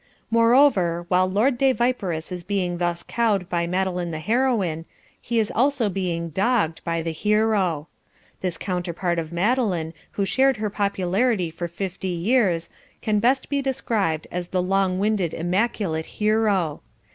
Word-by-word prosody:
Moreover 230 Hz, -8 st, +4 dB
while 185 Hz, 0 st, +3 dB
Lord 240 Hz, +6 st, +2 dB
de 270 Hz, -1 st, +4 dB
Viperous 200 Hz, -10 st, -1 dB
is 180 Hz, -1 st, -5 dB
being 180 Hz, -2 st, -1 dB
thus 175 Hz, -1 st, -1 dB
cowed 210 Hz, -6 st, 0 dB
by 170 Hz, -1 st, 0 dB
Madeline 180 Hz, -1 st, -1 dB
the 160 Hz, -, -4 dB
Heroine, 205 Hz, -5 st, 0 dB, 0.4 s
he 235 Hz, -, -2 dB
is 220 Hz, -2 st, +1 dB
also 255 Hz, -2 st, +2 dB
being 175 Hz, -3 st, -2 dB
"dogged" 190 Hz, -2 st, 0 dB
by 165 Hz, -1 st, -1 dB
the 165 Hz, -, -2 dB
Hero. 200 Hz, -4 st, +1 dB, 0.5 s
This 180 Hz, -3 st, -3 dB
counterpart 175 Hz, -1 st, -2 dB
of 160 Hz, -1 st, -5 dB
Madeline 180 Hz, -4 st, 0 dB, 0.2 s
who 200 Hz, -, 0 dB
shared 265 Hz, +4 st, +3 dB
her 210 Hz, -1 st, -2 dB
popularity 200 Hz, -1 st, 0 dB
for 170 Hz, +1 st, -4 dB
fifty 190 Hz, +2 st, -5 dB
years 180 Hz, -2 st, +1 dB, 0.4 s
can 210 Hz, -1 st, +2 dB
best 260 Hz, +5 st, +2 dB
be 280 Hz, -1 st, 0 dB
described 220 Hz, -, -1 dB
as 175 Hz, 0 st, -3 dB
the 185 Hz, -, -1 dB
Long 190 Hz, 0 st, +1 dB
winded 200 Hz, -4 st, 0 dB
Immaculate 175 Hz, -2 st, -1 dB
Hero. 210 Hz, -7 st, +1 dB
190 Hz, 145 wpm, -23 LUFS, 170-225 Hz, 0.5 s, Moreover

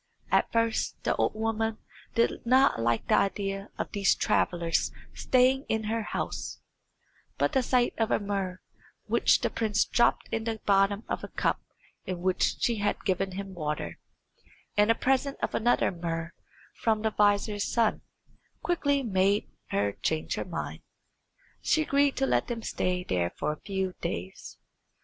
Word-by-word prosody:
At -, -, +3 dB
first 230 Hz, -1 st, 0 dB
the -, -, +1 dB
old -, -, +1 dB
woman 225 Hz, 0 st, -1 dB, 0.4 s
did 230 Hz, -, +1 dB
not 260 Hz, -, +4 dB
like 115 Hz, 0 st, 0 dB
the -, -, +2 dB
idea 195 Hz, 0 st, 0 dB
of -, -, -3 dB
these 200 Hz, -2 st, +3 dB
travellers 170 Hz, -2 st, +1 dB, 0.2 s
staying 260 Hz, +1 st, +3 dB
in 220 Hz, 0 st, 0 dB
her 225 Hz, +2 st, -1 dB
house, 215 Hz, -, -4 dB, 0.8 s
but -, -, +1 dB
the 265 Hz, -, +3 dB
sight 250 Hz, 0 st, +2 dB
of 225 Hz, -, +2 dB
a -, -, +3 dB
muhr, 195 Hz, -3 st, -3 dB, 0.4 s
which -, -, +3 dB
the -, -, 0 dB
prince 215 Hz, -2 st, +1 dB
dropped 240 Hz, -, +2 dB
in 225 Hz, -1 st, -2 dB
the 225 Hz, -1 st, -2 dB
bottom 200 Hz, +1 st, +3 dB
of -, -, -3 dB
a -, -, -4 dB
cup -, -, -1 dB, 0.4 s
in 185 Hz, -2 st, -4 dB
which 185 Hz, 0 st, +1 dB
she 235 Hz, -2 st, +2 dB
had 205 Hz, 0 st, -1 dB
given 190 Hz, 0 st, 0 dB
him 195 Hz, 0 st, -6 dB
water, 150 Hz, -, -4 dB, 0.8 s
and 210 Hz, +1 st, +4 dB
a 230 Hz, -, +5 dB
present 270 Hz, +3 st, +1 dB
of -, -, -1 dB
another 240 Hz, +2 st, +2 dB
muhr 165 Hz, -1 st, -4 dB, 0.4 s
from 220 Hz, -1 st, 0 dB
the 220 Hz, -, +1 dB
vizier's 205 Hz, 0 st, +2 dB
son, 230 Hz, -2 st, +2 dB, 0.6 s
quickly 285 Hz, -5 st, +1 dB
made 200 Hz, -2 st, +1 dB, 0.2 s
her 100 Hz, 0 st, 0 dB
change 155 Hz, +9 st, -2 dB
her -, -, -3 dB
mind. -, -, -5 dB, 0.8 s
She 315 Hz, -, +2 dB
agreed 280 Hz, -1 st, +2 dB
to 270 Hz, -, +2 dB
let -, -, +1 dB
them 230 Hz, -2 st, -4 dB
stay 180 Hz, 0 st, -1 dB
there 90 Hz, -, 0 dB
for 150 Hz, -, 0 dB
a 150 Hz, -, -8 dB
few 190 Hz, -2 st, -2 dB
days. 90 Hz, +2 st, -5 dB
205 Hz, 160 wpm, -28 LUFS, 185-230 Hz, 0.8 s, a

